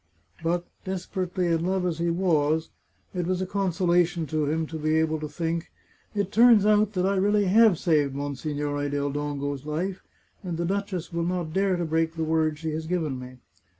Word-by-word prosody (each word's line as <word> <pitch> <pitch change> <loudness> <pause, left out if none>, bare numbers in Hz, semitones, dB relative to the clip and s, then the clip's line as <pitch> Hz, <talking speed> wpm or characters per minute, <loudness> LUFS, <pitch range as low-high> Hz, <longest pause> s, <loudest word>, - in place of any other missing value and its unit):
But, 170 +2 0 0.2
desperately 185 -1 -2
in 165 -1 +1
love 185 0 0
as 170 -2 -1
he 170 0 +1
was, 160 -3 +1 0.4
it 180 -2 -2
was 185 0 0
a 185 - -1
consolation 175 -3 +1
to 155 +1 -1
him 160 +2 0
to 160 0 -6
be 155 +1 +1
able 160 0 +1
to 155 - -4
think, 165 +2 -3 0.2
" - - -34
It 200 -1 -1
turns 230 -3 +6
out 210 0 +3
that 185 -1 0
I 195 +1 +2
really 205 +1 +3
have 210 -1 +5
saved 150 -6 +1
Monsignore 145 +1 -2
del 145 0 -1
Dongo's 145 -1 -3
life, 175 +6 -3 0.4
and 175 -4 -4
the 170 - -1
duchess 190 -2 -3
will 170 - -1
not 175 -2 -2
dare 195 0 +2
to 175 -1 -1
break 160 +1 0
the 165 - -2
word 155 -1 +1
she 160 0 -3
has 160 +1 -4
given 160 -7 -1
me." 125 0 -10
170 Hz, 195 wpm, -26 LUFS, 155-185 Hz, 0.4 s, turns